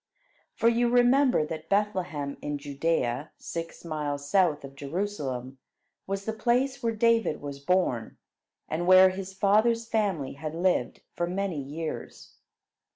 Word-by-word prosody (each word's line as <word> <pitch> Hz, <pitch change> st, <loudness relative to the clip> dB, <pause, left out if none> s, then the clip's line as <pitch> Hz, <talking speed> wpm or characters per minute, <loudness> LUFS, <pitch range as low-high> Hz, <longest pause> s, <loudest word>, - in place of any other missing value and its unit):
For 230 Hz, -, +2 dB
you 235 Hz, +1 st, +3 dB
remember 245 Hz, -, +4 dB
that 160 Hz, 0 st, -7 dB
Bethlehem 185 Hz, -9 st, -1 dB
in 145 Hz, 0 st, -3 dB
Judea, 145 Hz, -2 st, -1 dB
six 165 Hz, 0 st, -7 dB
miles 145 Hz, -3 st, -3 dB
south 170 Hz, -4 st, +2 dB
of 135 Hz, 0 st, -9 dB
Jerusalem, 140 Hz, -5 st, -4 dB, 0.5 s
was 195 Hz, 0 st, -3 dB
the 220 Hz, -, -2 dB
place 250 Hz, +4 st, +1 dB
where 230 Hz, -1 st, 0 dB
David 230 Hz, -5 st, +2 dB
was 140 Hz, -1 st, -7 dB
born, 140 Hz, -8 st, 0 dB, 0.5 s
and 170 Hz, +3 st, -2 dB
where 185 Hz, 0 st, +8 dB
his 190 Hz, 0 st, -6 dB
father's 220 Hz, +4 st, +3 dB
family 195 Hz, -12 st, -1 dB
had 155 Hz, +3 st, -6 dB
lived 175 Hz, -8 st, 0 dB
for 175 Hz, -, -1 dB
many 185 Hz, -4 st, -2 dB
years. 155 Hz, +4 st, -6 dB
175 Hz, 135 wpm, -27 LUFS, 145-210 Hz, 0.5 s, where